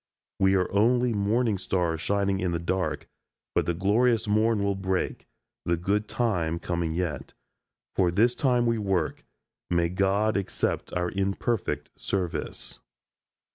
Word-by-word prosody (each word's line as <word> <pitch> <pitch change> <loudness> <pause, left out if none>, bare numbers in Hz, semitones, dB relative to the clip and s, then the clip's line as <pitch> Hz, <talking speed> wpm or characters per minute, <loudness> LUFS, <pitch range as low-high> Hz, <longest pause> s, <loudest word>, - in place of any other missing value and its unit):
We 95 0 +4
are 90 -1 +2
only 120 +4 +3
morning 105 +1 +1
stars 85 -4 -1
shining 100 -1 +1
in 90 -2 -1
the - - +1
dark, 90 +2 -2 0.5
but - - +1
the 85 - +1
glorious 110 +5 +2
morn 110 0 +2
will 100 0 +1
break, 95 -1 -2 0.4
the 85 0 +1
good 100 +5 0
time 90 -9 0
coming 85 -2 -2
yet. 85 -6 -3 0.6
For 90 -2 +3
this 110 +8 +3
time 125 -2 +2
we 115 -1 +1
work; 95 -6 -1 0.5
may 85 -1 +2
God 100 +4 +1
accept 100 - -2
our 90 0 0
imperfect 100 +3 -1
service." 90 -4 -3
95 Hz, 135 wpm, -27 LUFS, 90-110 Hz, 0.6 s, We